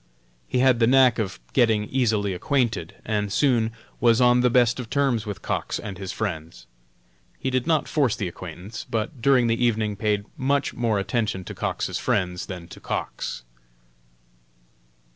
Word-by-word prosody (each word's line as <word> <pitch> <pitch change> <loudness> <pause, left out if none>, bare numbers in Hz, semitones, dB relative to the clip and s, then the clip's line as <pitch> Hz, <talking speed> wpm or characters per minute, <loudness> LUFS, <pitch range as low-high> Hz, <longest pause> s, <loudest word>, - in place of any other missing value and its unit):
He - - -1
had 125 -1 +4
the 115 - +4
knack 130 -2 +5
of 100 -4 -3
getting 115 -5 +3
easily 110 -6 0
acquainted, 120 +5 -1
and 105 -2 -1
soon 115 -2 +2 0.3
was 115 -1 +4
on 125 0 +5
the 125 - +4
best 120 0 +3
of 120 -3 -6
terms 130 -6 +1
with 105 - -6
Cox - - -2
and 100 -4 -7
his 95 -2 -4
friends. 80 - -5 0.7
He 130 - -2
did 130 +2 0
not 160 -2 +2
force 140 -8 +1
the 95 - -3
acquaintance, 90 +4 -8
but 115 +4 -3
during 130 -1 +4
the 115 +1 +1
evening 110 -3 +1
paid 105 0 0
much 140 +1 0
more 115 -3 0
attention 100 -1 -1
to - - -7
Cox's - - -2
friends 90 -2 -1
than 90 -3 -7
to - - -11
Cox. - - -4
115 Hz, 160 wpm, -24 LUFS, 100-125 Hz, 0.7 s, knack